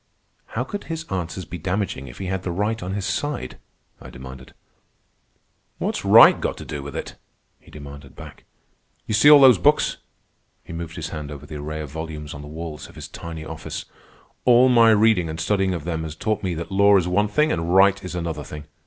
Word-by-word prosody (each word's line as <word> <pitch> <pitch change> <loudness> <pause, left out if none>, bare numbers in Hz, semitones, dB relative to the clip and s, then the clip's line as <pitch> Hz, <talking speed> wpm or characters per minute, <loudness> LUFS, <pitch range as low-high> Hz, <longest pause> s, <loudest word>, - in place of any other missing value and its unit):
"How - - 0
could 205 - -6
his 165 -1 -5
answers 90 0 -4
be 90 - -8
damaging 90 -6 -3
if - - -11
he 95 - -5
had 95 0 -2
the 95 - -4
right 105 +5 -1
on 95 +2 -4
his 100 -2 -3
side?" 145 - -3 0.4
I - - -10
demanded. 65 0 -11 1.2
"What's - - -3
right - - +7
got - - -2
to - - -9
do 75 -2 -5
with 70 0 -8
it?" - - -6 0.4
he - - -21
demanded 70 -1 -11
back. - - -12 0.6
"You - - -3
see 110 +8 +6
all 150 -1 +10
those 130 -7 +7
books." 85 - +2 0.7
He - - -10
moved 80 0 -6
his 80 -3 -5
hand 75 -2 -6
over 75 -1 -9
the 75 0 -8
array 75 +1 -5
of 75 -3 -8
volumes 75 -2 -6
on 70 - -8
the 75 - -10
walls 80 0 -7
of - - -17
his - - -8
tiny 80 -1 -8
office. - - -7 0.6
"All 125 +1 +6
my 115 -2 +6
reading 110 -6 +3
and 80 +1 -6
studying 95 0 0
of 80 - -6
them 80 -1 -3
has 80 -1 -6
taught 105 +4 -2
me 90 -3 -2
that 85 +2 -6
law 100 +1 +5
is 90 -2 0
one 100 +4 +2
thing 150 +9 +1
and 85 +1 -1
right 100 0 +5
is 90 -1 -6
another 80 -4 -4
thing. 75 0 -9
85 Hz, 215 wpm, -22 LUFS, 75-100 Hz, 1.2 s, all